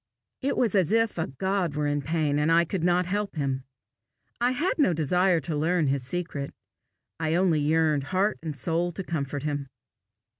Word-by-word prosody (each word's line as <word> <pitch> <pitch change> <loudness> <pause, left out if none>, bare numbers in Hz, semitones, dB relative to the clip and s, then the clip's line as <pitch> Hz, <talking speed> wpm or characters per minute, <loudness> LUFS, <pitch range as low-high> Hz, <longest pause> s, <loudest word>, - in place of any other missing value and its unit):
It 275 +1 -1
was 235 -4 +2
as 190 -3 +2
if 225 -4 +2
a 160 - 0
God 185 +2 -1
were 150 0 0
in 145 0 0
pain, 150 -1 0
and 150 +2 +2
I 170 +1 +5
could 175 0 -3
not 180 +1 +3
help 205 +2 -2
him. 135 -3 -2 0.7
I 240 +1 +3
had 300 +8 -1
no 275 - +4
desire 175 +3 +2
to 150 +2 -3
learn 160 0 +1
his 135 0 0
secret; 140 0 -4 0.7
I 160 0 0
only 175 -3 +3
yearned 150 -1 +2
heart 190 +6 0
and 155 -2 -5
soul 170 +4 0
to 195 - -5
comfort 145 -4 -3
him. 145 -2 -2
165 Hz, 185 wpm, -26 LUFS, 145-185 Hz, 0.7 s, I